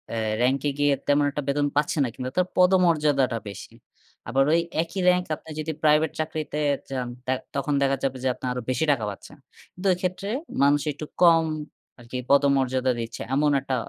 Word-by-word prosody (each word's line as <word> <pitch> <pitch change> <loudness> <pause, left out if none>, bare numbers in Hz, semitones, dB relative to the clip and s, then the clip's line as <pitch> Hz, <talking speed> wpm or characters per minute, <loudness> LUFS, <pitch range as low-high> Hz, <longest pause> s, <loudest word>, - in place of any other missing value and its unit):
আ - - -2 0.2
র‍্যাংকে 135 +3 +2
গিয়ে 145 -1 +3
তেমন 145 0 +3
একটা 145 0 -4
বেতন 145 +1 +1
পাচ্ছেন 150 +1 +1
না, - - -2
কিন্তু 130 0 -4
তার 180 - +3
পদমর্যাদাটা 155 -9 +3
বেশি। 100 - -10 0.6
আবার 135 +4 +3
ওই 170 - +4 0.2
একই 170 +3 -7
র‍্যাংকে 180 -2 +3
আপনি 160 - -16
যদি 155 +1 -2
প্রাইভেট 150 0 +4
চাকরিতে 155 -1 -3 0.3
যান 130 -2 -3 0.2
তার 130 0 0 0.2
তখন 140 +1 -1
দেখা 135 0 +2
যাবে 135 -1 -1
যে 130 - +1
আপনার 125 - -4
আরো 125 - -4
বেশি 130 +4 +1
টাকা 120 -6 0
পাচ্ছেন। 100 - -10 0.4
কিন্তু 190 +2 -4
এই - - -4
ক্ষেত্রে 185 +2 -3 0.3
মানুষ 145 +1 +4
একটু 155 +2 -7 0.2
কম 165 -2 +6 0.6
আরকি 120 +2 -7
পদমর্যাদা 135 -2 +3
দিচ্ছে। 115 0 -6
এমন 145 +1 +3
একটা 130 - -2
145 Hz, 180 wpm, -25 LUFS, 130-160 Hz, 0.6 s, কম